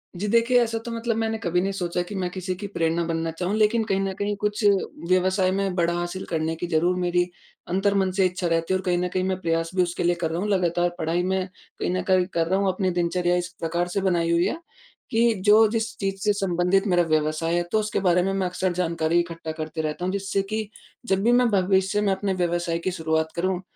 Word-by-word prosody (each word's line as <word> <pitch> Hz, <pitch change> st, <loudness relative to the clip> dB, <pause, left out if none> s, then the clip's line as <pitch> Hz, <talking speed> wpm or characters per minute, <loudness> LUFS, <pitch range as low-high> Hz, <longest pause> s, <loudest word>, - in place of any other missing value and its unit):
जी। 195 Hz, +4 st, -3 dB
देखिए 235 Hz, +3 st, +4 dB
ऐसा 230 Hz, -1 st, -2 dB
मतलब 230 Hz, 0 st, -2 dB
मैंने 225 Hz, 0 st, -1 dB
कभी 180 Hz, -4 st, 0 dB
नहीं 195 Hz, -, -1 dB
सोचा 180 Hz, -2 st, -2 dB
कि 205 Hz, -, -6 dB
मैं 185 Hz, -2 st, -1 dB
किसी 185 Hz, 0 st, -3 dB
की 200 Hz, +2 st, -6 dB
प्रेरणा 165 Hz, -3 st, 0 dB
बनना 165 Hz, 0 st, -2 dB
चाहूँ। 180 Hz, +5 st, -2 dB
लेकिन 220 Hz, +1 st, +3 dB
कहीं 195 Hz, -2 st, 0 dB
न 195 Hz, 0 st, -1 dB
कहीं 205 Hz, 0 st, -1 dB
कुछ 210 Hz, +1 st, -1 dB, 0.5 s
व्यवसाय 185 Hz, +1 st, +2 dB
में 195 Hz, -1 st, -1 dB
बड़ा 170 Hz, -1 st, +1 dB
हासिल 175 Hz, +2 st, -3 dB
करने 160 Hz, 0 st, -2 dB
की 175 Hz, +2 st, -4 dB
ज़रूर 175 Hz, +2 st, +2 dB
मेरी 175 Hz, 0 st, +2 dB, 0.5 s
अंतर्मन 195 Hz, +1 st, +1 dB
से 190 Hz, 0 st, +2 dB
इच्छा 180 Hz, 0 st, -1 dB
रहती 165 Hz, +2 st, 0 dB
है। -, -, +3 dB
और 185 Hz, -, -7 dB
कहीं 180 Hz, -1 st, +2 dB
न 180 Hz, +1 st, 0 dB
कहीं 185 Hz, 0 st, 0 dB
मैं 190 Hz, 0 st, -1 dB
प्रयास 165 Hz, -1 st, -1 dB
भी 185 Hz, -, +4 dB
उसके 175 Hz, 0 st, -3 dB
लिए 175 Hz, 0 st, +2 dB
कर 165 Hz, -, 0 dB
रहा 165 Hz, -, -2 dB
हूँ, 210 Hz, -, -1 dB
लगातार 175 Hz, -2 st, +1 dB
पढ़ाई 165 Hz, +3 st, 0 dB
में 190 Hz, 0 st, -1 dB, 0.3 s
कहीं -, -, -1 dB
न 185 Hz, -, 0 dB
कहीं 185 Hz, -1 st, +3 dB
कर 165 Hz, -1 st, +1 dB
रहा 190 Hz, +3 st, +1 dB
हूँ 200 Hz, -, +1 dB
अपनी 185 Hz, 0 st, 0 dB
दिनचर्या 175 Hz, 0 st, +1 dB
इस 175 Hz, 0 st, -3 dB
प्रकार 170 Hz, +2 st, -1 dB
से 195 Hz, +3 st, -2 dB
बनाई 170 Hz, -3 st, +1 dB
हुई 170 Hz, +1 st, +3 dB
है, -, -, -1 dB, 0.5 s
कि 230 Hz, +1 st, +3 dB
जो 215 Hz, +1 st, +7 dB
जिस 225 Hz, -1 st, -2 dB
चीज़ 195 Hz, -1 st, -2 dB
से 210 Hz, -, +3 dB
संबंधित 195 Hz, 0 st, +1 dB
मेरा 175 Hz, -2 st, +3 dB
व्यवसाय 155 Hz, +2 st, +1 dB
है, 175 Hz, -, +1 dB
तो 220 Hz, -, +3 dB
उसके 215 Hz, -1 st, -1 dB
बारे 180 Hz, -2 st, +3 dB
में 195 Hz, -, 0 dB
मैं 190 Hz, -1 st, 0 dB
अक्सर 180 Hz, 0 st, -1 dB
जानकारी 170 Hz, -1 st, +1 dB
इकट्ठा 165 Hz, -2 st, -4 dB
करते 155 Hz, 0 st, -4 dB
रहता 155 Hz, +3 st, -3 dB
हूँ। 185 Hz, -, 0 dB
जिससे 195 Hz, 0 st, -1 dB
कि 215 Hz, -1 st, -3 dB, 0.4 s
जब 195 Hz, -3 st, +1 dB
भी 240 Hz, -, +4 dB
मैं 245 Hz, 0 st, +4 dB
भविष्य 190 Hz, +1 st, +2 dB
में 200 Hz, -2 st, +2 dB
अपने 195 Hz, 0 st, -1 dB
व्यवसाय 175 Hz, -2 st, -1 dB
की 185 Hz, +2 st, -2 dB
शुरुआत 160 Hz, -2 st, -1 dB
करूँ, 185 Hz, +1 st, -1 dB
185 Hz, 235 wpm, -24 LUFS, 170-195 Hz, 0.5 s, जो